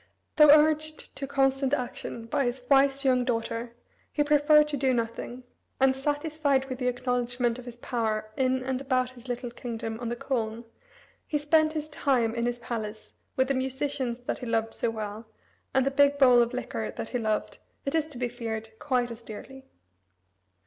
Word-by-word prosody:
Though 300 -1 +8
urged 310 +1 +4
to 275 - -3
constant 270 0 +2
action 245 -2 -5
by 275 +4 0
his 245 +1 -2
wise 275 0 +4
young 255 -1 +4
daughter, 230 -1 -2 0.4
he 295 - +2
preferred 300 +1 +5
to 295 - -1
do 260 -1 +2
nothing; 235 +2 -4 0.4
and, 265 0 +4
satisfied 290 0 0
with 260 -1 -6
the 250 - 0
acknowledgment 245 -1 0
of 250 - -10
his 240 -1 -9
power 220 -3 -2
in 260 -1 +1
and 260 0 -2
about 255 -2 0
his 250 0 -15
little 245 0 -4
kingdom 230 -2 -5
on 240 -1 -3
the 240 - -2
Colne, 235 -2 -3 0.6
he 300 - 0
spent 310 +1 +3
his 310 -1 -3
time 260 -6 +1
in 235 0 -1
his 240 0 -1
palace 220 -3 -6 0.2
with 260 0 +2
the - - +3
musicians 260 -1 -2
that - - -2
he 250 - -6
loved 225 0 0
so 235 - -1
well, 215 0 -5 0.4
and 265 0 +2
the 275 - +1
big 285 +1 +4
bowl 250 -3 +7
of 235 0 +1
liquor 115 - -3
that 225 - -6
he 245 - -1
loved, 215 -2 -1 0.3
it 275 - -2
is 320 -1 +1
to 295 -5 -10
be 245 0 0
feared, 225 -2 -5
quite 250 -4 0
as 230 0 -8
dearly. 265 +5 -10
255 Hz, 185 wpm, -28 LUFS, 235-275 Hz, 0.6 s, Though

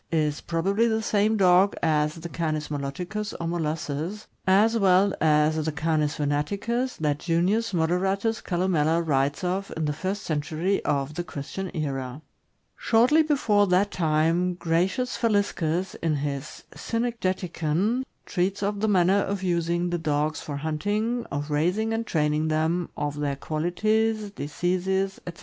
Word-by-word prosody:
is 150 -3 0
probably 195 +7 +1
the 220 -1 0
same 215 +1 +2
dog 190 +1 +5
as 150 -1 +2
the 165 0 -7
Canis 155 -2 -2
moloticus, 175 +9 -4
or 170 - -3
molossus, 165 +3 -3 0.2
as 210 +5 +4
well 195 -2 +4
as 155 0 +3
the 155 - -1
Canis 155 -1 0
venaticus 200 - -1
that 150 -2 0
Junius 185 +7 +1
Moderatus 190 +6 0
Calnmella 170 -3 +1
writes 140 +2 +1
of 190 +2 -2
in 160 - -1
the 150 - 0
first 190 +6 -3
century 160 +5 -1
of 140 0 0
the 175 +3 -3
Christian 175 +4 -6
era. 135 -1 -3 0.5
Shortly 245 +8 +4
before 230 -10 +2
that 190 +3 +2
time, 165 +2 +1
Gratlus 180 +10 0
Faliscus, 195 -6 0
in 165 -2 +1
his 140 -1 -4
"Cynegeticon," 195 -2 -1 0.2
treats 195 +2 -1
of 205 0 -1
the 220 - +1
manner 190 -1 +4
of 195 -1 -2
using 175 0 0
the 175 - -1
dogs 155 0 -1
for 145 -2 -5
hunting, 205 +11 -1
of 145 +2 -3
raising 180 +9 +1
and 225 0 -2
training 150 0 +1
them, 160 +3 0
of 145 0 -3
their 145 -1 -1
qualities, 210 +8 0
diseases, 190 +4 -1
etc. 170 - -7
175 Hz, 140 wpm, -26 LUFS, 155-200 Hz, 0.5 s, dog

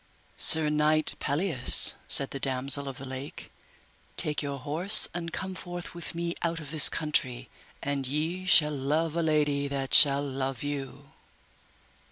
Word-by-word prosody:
Sir 160 -1 +4
knight 150 +1 0
Pelleas, 150 -3 +4
said 140 - +4
the 140 - -6
Damosel 135 +2 0
of 135 -1 -8
the 135 - -10
Lake, 130 +2 -9 0.7
take 150 -1 +1
your 140 -1 -6
horse 160 +10 +3
and 170 -1 -6
come 190 +2 -6
forth 175 -1 -9
with 170 -1 -8
me 170 0 -4
out 170 -1 -3
of 150 -2 -10
this 155 -3 +4
country, 140 -6 -2 0.3
and 140 -2 -4
ye 160 +7 -4
shall 150 -5 +4
love 150 +4 -2
a 170 - -1
lady 150 -3 -1
that 135 -1 -5
shall 140 -1 +5
love 135 -2 -5
you. 140 -1 -7
150 Hz, 155 wpm, -26 LUFS, 140-165 Hz, 0.7 s, shall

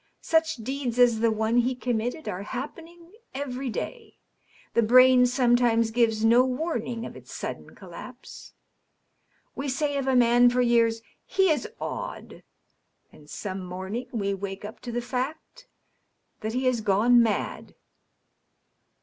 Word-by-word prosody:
Such 320 0 +2
deeds 255 +1 -4
as 240 -3 +4
the 230 0 +3
one 220 +2 0
he 250 +2 +2
committed 245 +4 -3
are 180 - -4
happening 330 - -8 0.2
every 265 -1 -4
day. 450 - -6 0.6
The 235 - +3
brain 250 +2 +6
sometimes 240 -2 +2
gives 225 -2 +1
no 235 +3 +6
warning 250 -4 -3
of - - -9
its - - -13
sudden - - -7
collapse. - - -11 1.0
We 275 +1 -4
say 285 +2 -1
of 270 -1 -2
a 265 - +2
man 245 0 +5
for 245 +1 -1
years, 230 -1 +2
* - - -48
he 380 -3 +5
is 295 -6 -1
odd,' - - -6 0.7
and 150 -1 -18
some 190 +1 -5
morning 190 +7 -5
we 200 -4 -1
wake 195 +1 -6
up 210 - -9
to 245 - -7
the 240 0 -3
fact 275 - -5 0.7
that 220 +1 -4
he 255 +2 -1
has 250 -3 +1
gone 220 +4 +4
mad. 225 -2 -2
245 Hz, 145 wpm, -26 LUFS, 225-260 Hz, 1.0 s, brain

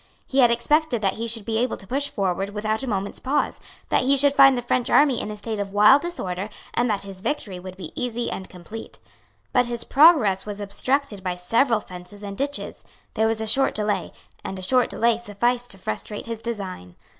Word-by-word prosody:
He 270 - -1
had 245 -2 +7
expected 240 0 +1
that 195 -1 +2
he 230 - -2
should 225 -2 -3
be 225 -1 -1
able 250 +2 -1
to - - -12
push 275 +7 -1
forward 195 -1 -1
without 215 +2 -1
a 270 - -4
moment's 200 -1 -3
pause, 285 +3 -1 0.3
that - - +3
he 275 +2 +3
should 280 +1 +5
find 275 -2 +7
the 245 - -3
French 245 0 0
army 280 -5 +4
in - - -5
a 210 - -6
state 215 +1 -4
of 200 -1 -4
wild 210 +7 +6
disorder, 200 - -3 0.2
and 240 0 +1
that 205 -2 0
his 195 -2 -9
victory 210 -6 -3
would 185 +1 -9
be 175 -5 -7
easy 240 -1 -3
and 190 - -6
complete. 185 +5 -10 0.6
But 250 -1 +3
his 235 -1 -1
progress 270 - +5
was 205 -1 -6
obstructed 210 +1 -1
by 180 -1 -2
several 230 +6 +2
fences 180 +3 -11
and 200 -1 -6
ditches; 285 +5 -4 0.3
there 220 -1 +2
was 225 0 -1
a - - -2
short 265 +5 +2
delay; 210 -1 -1 0.3
and 190 - -5
a 185 - -7
short 250 +6 +3
delay 230 0 +1
sufficed 240 +2 -1
to 195 - -6
frustrate 190 - -5
his 230 -1 -6
design. 195 - -6
220 Hz, 215 wpm, -23 LUFS, 195-250 Hz, 0.6 s, had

